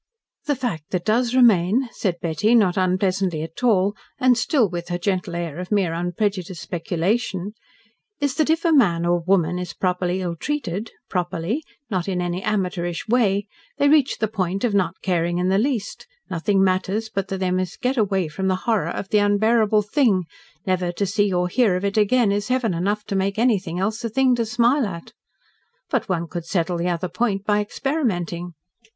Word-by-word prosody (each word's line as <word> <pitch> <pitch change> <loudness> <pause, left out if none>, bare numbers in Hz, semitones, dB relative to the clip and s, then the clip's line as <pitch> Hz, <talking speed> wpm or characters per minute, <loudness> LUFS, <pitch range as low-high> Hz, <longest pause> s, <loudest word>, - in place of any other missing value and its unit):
"The 290 - +1
fact 205 - -4
that 180 -2 -2
does 235 +3 +1
remain," 230 0 +4
said 180 -5 -2
Betty, 170 +8 +1
not 195 -6 +4
unpleasantly 185 -3 0
at 165 +9 -9
all, 205 -4 +3 0.2
and 255 -1 +4
still 235 +1 +2
with 175 -1 -5
her 175 - -1
gentle 180 -1 -2
air 170 -2 -4
of 180 +2 -6
mere 195 -5 +2
unprejudiced 180 +1 -2
speculation, 185 +4 -2 0.7
"is 285 -2 0
that, 310 -1 +2
if 325 +2 +1
a 335 - +4
man 175 - +3
or 175 0 +2
woman 180 -1 +1
is 180 - -6
properly 180 0 -1
ill 175 -1 -2
treated 220 - -3 0.2
PROPERLY 180 - -2 0.3
not 185 -2 -1
in 185 -2 -1
any 175 +1 -2
amateurish 180 -4 -2
way 210 -4 +2 0.3
they 285 - +3
reach 290 -3 +3
the 220 - 0
point 195 -2 -2
of 235 -4 +1
not 185 -3 +1
caring 175 -2 0
in 180 +1 +1
the 195 +1 +3
least 235 - -2 0.2
nothing 190 +3 +1
matters, 190 +4 0
but 195 -3 -3
that 195 - -3
they 185 -1 -1
must 185 0 -2
get 255 +2 0
away 195 -6 +1
from 190 +5 -3
the 185 - +2
horror 225 -4 +1
of 195 - -5
the 210 - +3
unbearable 215 +1 +3
thing 210 -4 +2 0.4
never 185 -2 0
to 200 +3 -1
see 205 +1 +1
or 180 0 +1
hear 210 0 +2
of 185 +2 -2
it 200 - -1
again 215 +1 +3
is 205 +1 -1
heaven 250 -5 +1
enough 200 +5 -1
to 200 - -4
make 195 +1 0
anything 200 -8 +1
else 215 +5 -2
a 230 - -1
thing 260 +3 +3
to 235 -2 0
smile 240 +3 +2
at. 170 -3 -8 0.8
But 255 -8 0
one 170 -2 -1
could 170 0 -6
settle 175 -1 0
the 175 +1 0
other 175 +1 -1
point 195 +2 -1
by 210 0 +2
experimenting. 180 - -2
195 Hz, 190 wpm, -22 LUFS, 180-220 Hz, 0.8 s, remain